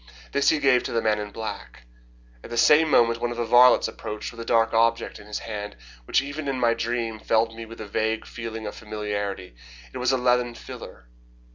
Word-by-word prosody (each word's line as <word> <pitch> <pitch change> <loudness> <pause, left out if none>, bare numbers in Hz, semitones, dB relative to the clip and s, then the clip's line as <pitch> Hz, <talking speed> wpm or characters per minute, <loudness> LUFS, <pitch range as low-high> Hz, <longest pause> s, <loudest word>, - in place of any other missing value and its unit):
This 140 - +3
he 160 - +3
gave 135 -4 +4
to - - -3
the 115 - +1
man 110 -1 +1
in 105 0 -5
black. 110 - -7 0.6
At - - -10
the 120 - -5
same 155 +5 +5
moment 115 -4 +3
one 120 - 0
of 120 - -5
the 120 - -1
varlets 120 +2 +6
approached 105 0 -6
with 115 - -13
a - - -7
dark 115 -1 +2
object 115 +1 +1
in 100 - -14
his 105 - -4
hand, 105 - -6 0.3
which 135 - +2
even 145 +1 -6
in 135 -2 -1
my 120 -1 +3
dream 115 -1 -2
filled 115 +1 +1
me 115 0 -8
with 115 - -11
a 110 - -6
vague 110 +2 -1
feeling 115 -1 -7
of 105 - -5
familiarity. 105 - -5 0.4
It - - -5
was 125 +1 +2
a 130 - +2
leathern 125 -1 +1
filler. - - -10
115 Hz, 220 wpm, -25 LUFS, 110-120 Hz, 0.6 s, varlets